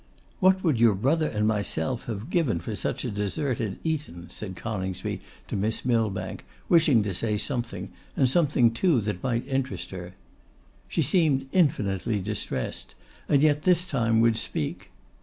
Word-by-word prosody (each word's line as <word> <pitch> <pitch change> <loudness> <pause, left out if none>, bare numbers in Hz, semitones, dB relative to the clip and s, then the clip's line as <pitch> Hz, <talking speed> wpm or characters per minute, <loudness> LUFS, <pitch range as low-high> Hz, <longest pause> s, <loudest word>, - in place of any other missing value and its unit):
'What 190 0 +4
would 155 -10 +2
your 115 -3 +5
brother 150 +10 +2
and 105 -1 0
myself 105 +1 -1
have 110 - -5
given 140 - +2
for - - -5
such - - -2
a - - -2
dessert 105 +6 -1
at 105 -4 -3
Eton!' 145 - -3
said 95 -3 -6
Coningsby 95 -3 -4 0.3
to - - -4
Miss 110 +4 -1
Millbank, 115 -5 0 0.2
wishing 155 -10 +5
to 100 -2 -2
say 105 +3 0
something, 120 +2 -3 0.3
and 130 - +4
something 135 -5 +3
too 150 +3 +2
that 105 -3 -3
might 125 0 -1
interest 135 -1 -2
her. 90 -1 -8 0.7
She - - 0
seemed 150 -7 +2
infinitely 110 - +1
distressed, 95 - -3 0.3
and 145 -1 +4
yet 150 -1 +4
this 180 0 +3
time 115 -6 +2
would 115 -1 +4
speak. 75 -8 -2
115 Hz, 160 wpm, -26 LUFS, 105-145 Hz, 0.7 s, your